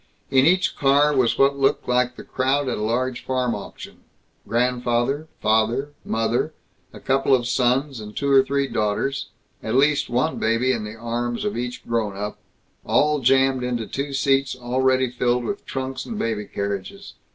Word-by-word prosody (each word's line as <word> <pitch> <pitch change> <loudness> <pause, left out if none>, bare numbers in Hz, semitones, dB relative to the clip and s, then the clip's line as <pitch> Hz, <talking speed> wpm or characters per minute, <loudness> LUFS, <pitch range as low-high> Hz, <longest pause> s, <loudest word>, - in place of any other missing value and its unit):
In 135 +1 +5
each 185 +2 +2
car 145 +2 +3
was 125 -3 +2
what 140 0 +3
looked 135 - +1
like 125 0 +1
the - - -10
crowd 135 +2 0
at 125 - -2
a - - -4
large 120 +3 -1
farm 125 -2 0
auction - - -9 0.5
grandfather, 125 +4 0 0.2
father, 110 +6 +1
mother, 115 0 -1 0.4
a - - -11
couple 135 0 +2
of 120 -2 -2
sons 130 +2 +1
and 105 0 -9
two 140 -1 0
or 135 -1 +7
three 140 0 0
daughters, 130 +6 -1 0.3
at 110 +2 -2
least 145 +2 +3
one 130 +7 0
baby 115 +3 +2
in 115 -4 -2
the 105 +1 -7
arms 120 - -3
of 210 - -1
each 125 +1 -5
grown 110 -4 -1
up, 105 +1 -5 0.4
all 150 0 +2
jammed 135 0 +3
into 120 -2 -2
two 140 +5 -4
seats 135 -1 +1
already 130 +1 +1
filled 125 0 0
with 200 +10 -5
trunks 130 0 -4
and 230 - -5
baby 110 - -2
carriages. 100 -1 -5
130 Hz, 170 wpm, -23 LUFS, 120-135 Hz, 0.5 s, or